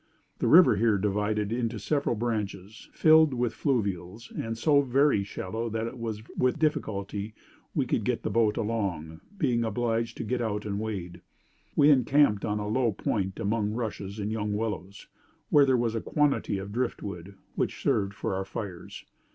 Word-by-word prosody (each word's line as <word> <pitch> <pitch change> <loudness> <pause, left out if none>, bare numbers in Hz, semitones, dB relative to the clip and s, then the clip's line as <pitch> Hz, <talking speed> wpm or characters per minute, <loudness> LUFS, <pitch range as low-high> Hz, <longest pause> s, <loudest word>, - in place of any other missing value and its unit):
The - - +1
river 165 - +7
here 110 -1 +3
divided 105 +1 0
into 115 -1 -1
several 140 +4 0
branches, 105 -3 -4
filled 155 -3 +5
with 120 -1 0
fluvials, 100 - -2
and 115 0 -4
so 145 +4 +4
very 135 -4 +3
shallow 110 +4 -4
that 110 +1 -2
it 120 +2 -6
was 110 -2 -4
with 130 +2 +1
difficulty 105 -8 -2 0.4
we - - +1
could - - 0
get - - -1
the - - -2
boat 110 -2 +2
along, 90 -8 -2 0.2
being 125 -9 +1
obliged 115 +1 -1
to - - -3
get 120 +2 -1
out 105 -2 -2
and 100 -1 -2
wade. 95 -5 -5 0.5
We 145 +1 +6
encamped 130 -4 +4
on 105 0 -1
a 105 0 -3
low 115 +1 +1
point 95 -1 -2
among 105 0 0
rushes 110 -3 -4
and 105 0 -3
young 105 -1 -2
willows, 105 -3 -4 0.4
where 145 -2 +6
there 130 -1 +4
was 120 -2 0
a 115 - -2
quantity 145 -8 +1
of 95 +1 -6
driftwood, 100 -6 -4 0.2
which - - -2
served 100 0 0
for - - -3
our 95 +1 -1
fires. 95 -3 -7
110 Hz, 170 wpm, -28 LUFS, 100-120 Hz, 0.5 s, river